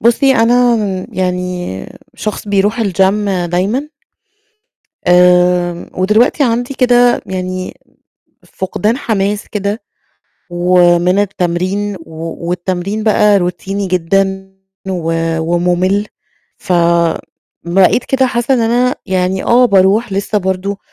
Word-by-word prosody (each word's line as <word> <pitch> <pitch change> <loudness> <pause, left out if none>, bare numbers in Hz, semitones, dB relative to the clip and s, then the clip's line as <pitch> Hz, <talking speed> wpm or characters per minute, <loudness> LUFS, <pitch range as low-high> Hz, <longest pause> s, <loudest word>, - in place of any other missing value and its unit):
بُصي 240 +4 +3
أنا 240 +1 +3 0.4
يعني 180 - -3 0.3
شخص 215 0 -5
بيروح 205 +3 +1
الgym 200 0 +1 0.2
دايمًا، 200 - -1 1.2
آمم، 180 -1 +3
ودلوقتي 215 - +2
عندي 245 +2 -1
كده 245 -1 +3
يعني 185 0 -4 0.7
فقدان 210 +4 -2
حماس 205 -5 -2
كده 205 +1 -3 0.7
ومن 175 +1 +3
التمرين، 195 +1 -1
و 165 +1 -7
والتمرين 185 +4 -3
بقى 210 -1 +4
روتيني 195 +2 -3
جدًا 190 +2 -1 0.4
و 170 -3 -2 0.3
وممل 180 +4 0 0.5
فبقيت 170 +3 0
كده 265 -1 +2
حاسّة 240 +1 0
إن 255 - +2
أنا 245 +2 +1
يعني 185 -1 -1
آه 245 +1 +4
باروح 200 +2 +2
لِسّه 200 +2 -1
برضه 190 +1 -2
190 Hz, 100 wpm, -14 LUFS, 180-215 Hz, 1.2 s, بقى